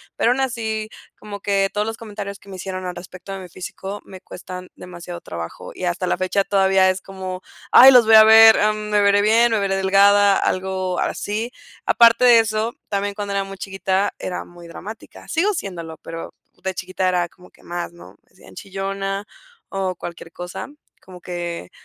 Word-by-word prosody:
Pero 235 Hz, -, +2 dB
aún 255 Hz, -, 0 dB
así, 220 Hz, -4 st, -2 dB, 0.3 s
como 205 Hz, -1 st, -8 dB
que 195 Hz, -1 st, +1 dB
todos 210 Hz, 0 st, -1 dB
los 225 Hz, 0 st, -4 dB
comentarios 205 Hz, -2 st, -7 dB
que 200 Hz, -, -17 dB
me 190 Hz, -, -8 dB
hicieron 185 Hz, 0 st, -6 dB
al 180 Hz, -, -5 dB
respecto 185 Hz, +2 st, -10 dB
de 195 Hz, -, -6 dB
mi 180 Hz, -, -11 dB
físico 190 Hz, +3 st, -7 dB
me 185 Hz, -1 st, -12 dB
cuestan 180 Hz, 0 st, -9 dB
demasiado 175 Hz, -1 st, -9 dB
trabajo 85 Hz, +1 st, -8 dB
y -, -, -8 dB
hasta 180 Hz, +1 st, -1 dB
la -, -, 0 dB
fecha 185 Hz, +2 st, 0 dB
todavía 190 Hz, -1 st, +3 dB
es 185 Hz, 0 st, -1 dB
como, 185 Hz, -1 st, -7 dB, 0.3 s
ay, 265 Hz, +1 st, +10 dB
los 250 Hz, -3 st, +7 dB
voy 220 Hz, -, +7 dB
a 220 Hz, -, +10 dB
ver, 220 Hz, 0 st, +8 dB
am, 215 Hz, 0 st, 0 dB
¿me 210 Hz, -1 st, +3 dB
veré 200 Hz, 0 st, +4 dB
bien?, 230 Hz, +3 st, +4 dB
¿me 220 Hz, -, +2 dB
veré 195 Hz, -1 st, 0 dB
delgada?, 200 Hz, +1 st, +5 dB
algo 185 Hz, -1 st, -1 dB
así. 220 Hz, +4 st, -2 dB, 0.3 s
Aparte 235 Hz, +1 st, +5 dB
de 240 Hz, -2 st, +8 dB
eso, 225 Hz, +1 st, -1 dB, 0.2 s
también 200 Hz, 0 st, -2 dB
cuando 200 Hz, -1 st, -5 dB
era 195 Hz, -, +1 dB
muy 195 Hz, 0 st, -9 dB
chiquita, 195 Hz, +1 st, -1 dB
era 180 Hz, -, -5 dB
muy 175 Hz, -1 st, -14 dB
dramática, 215 Hz, +6 st, -11 dB
sigo 385 Hz, +6 st, +1 dB
siéndolo, 170 Hz, -, -6 dB
pero 165 Hz, 0 st, -8 dB, 0.3 s
de 190 Hz, -, -2 dB
chiquita 185 Hz, 0 st, -3 dB
era 175 Hz, -1 st, 0 dB
como 180 Hz, +2 st, -19 dB
que -, -, -24 dB
más, 175 Hz, 0 st, -5 dB
¿no? 170 Hz, -, -14 dB
Me -, -, -38 dB
decían -, -, -18 dB
chillona 195 Hz, +1 st, -4 dB, 0.4 s
o 190 Hz, -2 st, -2 dB
cualquier 170 Hz, -1 st, -9 dB
cosa, 175 Hz, 0 st, -7 dB, 0.3 s
como 180 Hz, -1 st, -14 dB
que, 175 Hz, -, -5 dB
195 Hz, 190 wpm, -21 LUFS, 185-210 Hz, 0.4 s, ay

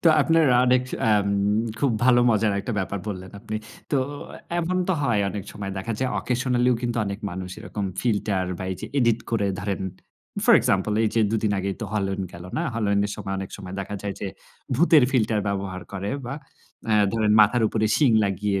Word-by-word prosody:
তো 170 Hz, -, +6 dB
আপনার 165 Hz, -2 st, +4 dB, 0.2 s
অনেক 125 Hz, 0 st, +4 dB, 0.3 s
আ -, -, +4 dB, 0.7 s
খুব 135 Hz, 0 st, +2 dB
ভালো 125 Hz, -1 st, +6 dB
মজার 110 Hz, -1 st, +2 dB
একটা 110 Hz, +4 st, -4 dB
ব্যাপার 100 Hz, +1 st, -2 dB
বললেন 95 Hz, -2 st, -6 dB
আপনি। 110 Hz, -1 st, -4 dB, 0.4 s
তো 140 Hz, -, +4 dB, 0.6 s
এমন 175 Hz, +2 st, 0 dB
তো -, -, +4 dB
হয় 120 Hz, -6 st, +2 dB
অনেক 100 Hz, -2 st, -5 dB
সময় 100 Hz, -2 st, -5 dB
দেখা 115 Hz, +5 st, -3 dB
যায়। 130 Hz, -1 st, 0 dB
অকেশনালিও 125 Hz, -1 st, +1 dB
কিন্তু 120 Hz, -1 st, -1 dB
অনেক 100 Hz, +2 st, -4 dB
মানুষ 90 Hz, 0 st, -6 dB
এরকম 105 Hz, -2 st, -5 dB, 0.2 s
ফিল্টার 105 Hz, -5 st, 0 dB
বা -, -, -4 dB
এই 95 Hz, -, -2 dB
যে, -, -, -5 dB
এডিট 120 Hz, -3 st, +3 dB
করে। 110 Hz, -3 st, +1 dB
ধরেন 100 Hz, 0 st, -2 dB, 0.6 s
ফর -, -, +7 dB
এক্সাম্পল, 95 Hz, +2 st, +1 dB
এই -, -, +3 dB
যে, 115 Hz, -, +3 dB
২ 110 Hz, -, +1 dB
দিন 105 Hz, -, +2 dB
আগেই 95 Hz, 0 st, -2 dB
তো 110 Hz, -, -2 dB
হলোইন 95 Hz, -2 st, -1 dB
গেল 85 Hz, 0 st, -10 dB
না? 165 Hz, -, 0 dB
হলোইন 100 Hz, -3 st, +1 dB
এর 105 Hz, -, -5 dB
সময় 95 Hz, 0 st, -4 dB
অনেক 95 Hz, -1 st, -5 dB
সময় 95 Hz, -2 st, -8 dB
দেখা 100 Hz, +1 st, -5 dB
যায় 100 Hz, -1 st, -3 dB
যে, 100 Hz, -, -3 dB, 0.5 s
ভূতের 155 Hz, -1 st, +5 dB
ফিল্টার 110 Hz, -4 st, +2 dB
ব্যবহার 95 Hz, -2 st, -3 dB
করে 100 Hz, 0 st, -3 dB, 0.2 s
বা 135 Hz, -, -4 dB, 0.6 s
এ্যা 105 Hz, -1 st, +5 dB
ধরেন 110 Hz, -2 st, +2 dB
মাথার 110 Hz, +3 st, +4 dB
উপরে 110 Hz, -1 st, 0 dB
শিং 145 Hz, -5 st, +4 dB
লাগিয়ে 100 Hz, 0 st, 0 dB
105 Hz, 195 wpm, -24 LUFS, 100-120 Hz, 0.7 s, ফর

